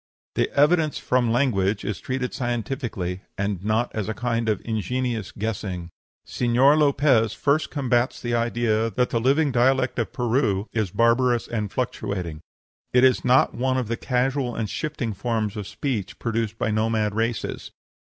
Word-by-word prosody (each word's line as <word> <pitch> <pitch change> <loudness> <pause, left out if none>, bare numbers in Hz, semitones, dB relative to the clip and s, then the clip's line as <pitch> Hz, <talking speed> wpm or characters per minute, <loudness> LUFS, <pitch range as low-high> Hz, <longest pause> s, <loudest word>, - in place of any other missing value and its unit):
The - - +1
evidence 155 +1 +3
from 125 -2 +1
language 105 -6 +1
is 100 0 -3
treated 130 -1 -3
scientifically, 120 - -3 0.2
and 100 -2 -2
not 110 +3 0
as 110 -1 -3
a 110 - -3
kind 115 0 -1
of 105 - +1
ingenious 115 0 -2
guessing. 100 -5 -4 0.3
Señor 125 +4 +3
Lopez 140 -6 +3
first 150 +2 +1
combats 125 -4 0
the 120 -1 -3
idea 115 -1 +1
that 125 +4 0
the 115 - +1
living 140 +4 +3
dialect 130 +1 +2
of 115 - -1
Peru 115 -5 0
is 110 -4 0
barbarous 120 +3 +2
and 105 -4 -3
fluctuating. 95 -10 -3 0.5
It 125 0 +4
is 130 -1 +4
not 125 +1 +4
one 130 +1 0
of 125 -4 -2
the 115 - 0
casual 125 0 -1
and 110 - -2
shifting 130 -4 -3
forms 110 -1 -2
of 105 -3 -5
speech 110 -9 -3
produced 115 -1 -2
by 110 - 0
nomad 110 -1 +1
races. 115 +1 -2
115 Hz, 155 wpm, -24 LUFS, 110-130 Hz, 0.5 s, It